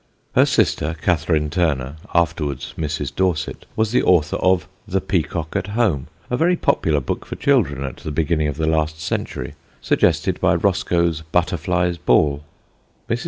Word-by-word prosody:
Her - - +5
sister, 80 +2 +1
Catherine 80 -3 +1
Turner, 75 -5 0 0.2
afterwards 80 -5 0
Mrs. 75 -2 -3
Dorset, 90 -5 -1
was 110 -1 +1
the 125 - +3
author 80 -5 +3
of 95 -1 +2 0.2
The - - 0
Peacock 80 +1 -2
at 100 -1 -1
Home, 95 - +1 0.2
a 125 - -1
very 170 +7 +3
popular 80 - +1
book 65 - -3
for - - -7
children 95 - +1
at 65 - -5
the - - -6
beginning 80 0 +1
of 75 - -4
the 80 - 0
last 80 0 0
century, 85 - -3 0.3
suggested - - +1
by - - +4
Roscoe's 85 -2 +1
Butterfly's 90 0 0
Ball. 75 -1 +2 0.6
Mrs. - - 0
80 Hz, 155 wpm, -21 LUFS, 75-90 Hz, 0.6 s, Her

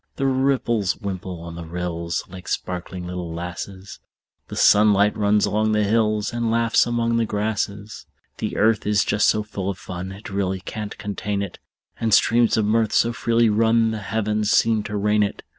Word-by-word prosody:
The 135 - -2
ripples 130 -6 +1
wimple 95 -3 -5
on 85 -1 -8
the 85 0 -7
rills, 85 -1 -3
Like 90 0 -11
sparkling 90 0 -4
little 90 -1 -5
lasses; 90 +3 -7 0.5
The - - -7
sunlight 105 0 +5
runs 105 -1 +2
along 110 +1 +1
the 105 0 +2
hills, 110 0 +1
And 120 -1 -1
laughs 115 +1 +3
among 115 -1 0
the 115 - +2
grasses. 105 0 -3 0.3
The - - -3
earth 110 0 +2
is 105 -1 +2
just 105 0 +2
so 105 - +2
full 100 -2 -4
of 95 - -4
fun 90 +1 -7
It 100 +1 -10
really 95 -1 -1
can't 105 +2 -6
contain 100 0 -3
it; 100 - -8 0.4
And 110 -2 +3
streams 115 -1 +3
of 110 - +2
mirth 110 +1 +1
so 115 +1 +3
freely 115 +2 +2
run 115 +1 +3
The 110 - -3
heavens 105 0 -1
seem 110 0 +3
to 105 - -3
rain 105 +1 +2
it. 100 - -2
105 Hz, 180 wpm, -22 LUFS, 95-110 Hz, 0.5 s, sunlight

